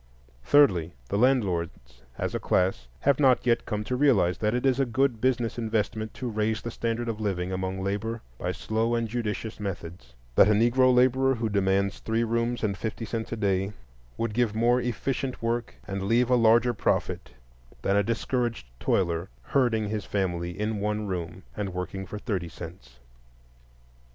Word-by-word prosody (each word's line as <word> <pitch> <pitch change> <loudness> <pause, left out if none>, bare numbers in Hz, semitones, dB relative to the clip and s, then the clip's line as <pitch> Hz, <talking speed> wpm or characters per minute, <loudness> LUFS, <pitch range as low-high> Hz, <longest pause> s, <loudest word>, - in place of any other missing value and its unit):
Thirdly, 90 - +4
the 100 - 0
landlords 85 - 0 0.2
as - - -2
a - - -1
class 90 -9 +1
have 140 -1 +3
not 130 -3 +4
yet 120 -1 +2
come 105 0 -2
to 125 - -2
realize 110 -11 +3
that 105 +2 +1
it 125 - -1
is 130 -1 +3
a 135 - +3
good 120 -1 +1
business 120 -2 0
investment 110 -1 -1
to 130 - -4
raise 110 -1 0
the 120 - -6
standard 115 +1 -2
of 110 -1 -3
living 95 -3 -1
among 95 0 -3
labor 110 +4 -2 0.2
by - - -1
slow 115 +2 -1
and 115 -1 0
judicious 110 -1 -3
methods; 85 -10 -6 0.2
that 95 - +6
a 105 - +5
Negro 120 +4 +4
laborer 130 +1 +4
who 115 -1 -1
demands 100 -1 +1
three 115 +1 0
rooms 115 +1 -1
and 100 -2 +1
fifty 110 +1 -4
cents 110 0 -4
a - - -1
day 100 -2 0 0.4
would 115 -2 -2
give 115 -2 +1
more 120 +2 +3
efficient 125 +2 -2
work 115 0 -2
and 95 0 -3
leave 115 +5 +2
a - - +6
larger 120 +1 +4
profit 100 - -1 0.5
than 100 - +2
a 100 - +5
discouraged 115 - -1
toiler 85 0 0
herding 115 -6 +1
his 105 -1 -2
family 90 -2 -2
in 105 0 -1
one 105 +1 -1
room 95 -1 -4
and 100 -3 -4
working 95 +1 -4
for 105 - -6
thirty 95 -6 -3
cents. 85 -7 -11
110 Hz, 175 wpm, -27 LUFS, 95-120 Hz, 0.5 s, that